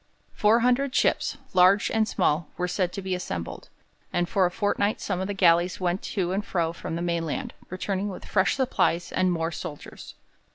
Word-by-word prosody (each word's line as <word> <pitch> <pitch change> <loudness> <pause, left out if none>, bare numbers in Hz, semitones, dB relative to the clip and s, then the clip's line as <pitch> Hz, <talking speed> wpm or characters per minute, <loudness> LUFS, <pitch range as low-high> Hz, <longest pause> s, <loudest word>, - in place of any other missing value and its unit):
Four 220 +3 +3
hundred 255 +2 +2
ships, - - +1 0.2
large 185 +2 +5
and 220 -1 +2
small, 155 -4 +1
were 180 - -1
said 180 0 -1
to 195 - -5
be 190 0 -2
assembled, 90 - -5 0.4
and 175 0 0
for 185 0 +2
a - - -2
fortnight 205 +2 0
some 185 -3 -2
of 190 - -2
the 205 - -3
galleys 175 -1 +3
went 180 +1 0
to 180 -4 -2
and 195 +2 -1
from 170 -3 -2
the 170 - -3
mainland, 170 - -2 0.2
returning 195 +2 -2
with 190 - -8
fresh 190 -1 +2
supplies 245 -10 0
and 185 -1 +2
more 165 -1 -1
soldiers. 160 -3 -8
185 Hz, 180 wpm, -26 LUFS, 175-205 Hz, 0.4 s, large